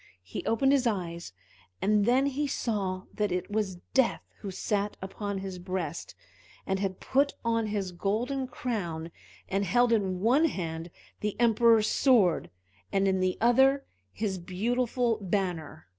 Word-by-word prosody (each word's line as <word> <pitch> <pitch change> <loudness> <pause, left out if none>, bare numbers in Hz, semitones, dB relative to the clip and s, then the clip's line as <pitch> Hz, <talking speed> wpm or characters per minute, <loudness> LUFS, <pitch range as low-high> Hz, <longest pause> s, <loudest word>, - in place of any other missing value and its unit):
He 90 - -6
opened 270 +4 +3
his 270 -3 +3
eyes, 170 - -3 0.5
and 210 0 +3
then 255 +4 +4
he 280 +1 0
saw 195 -8 -2
that 210 -2 -1
it 180 +3 -2
was 205 -3 -1 0.2
Death 265 -3 +2 0.2
who 200 - -6
sat 205 +2 -2
upon 200 +1 -4
his 190 -1 -5
breast, 175 -3 -4 0.5
and 190 0 -1
had 190 -1 -2
put 280 +2 +1
on 230 -1 +1
his 200 -3 -2
golden 235 +9 -1
crown, 175 -11 -4 0.4
and 195 +1 0
held 240 +5 +3
in 190 -4 +1
one 250 - +4
hand 165 - -3 0.3
the 210 +1 -3
Emperor's 230 -1 +5
sword, 215 - +3 0.4
and 195 0 +2
in 190 -1 +2
the 185 0 +1
other 265 +4 +4 0.3
his 200 -3 -2
beautiful 235 +6 0
banner. 180 - -2
205 Hz, 145 wpm, -29 LUFS, 185-240 Hz, 0.5 s, Emperor's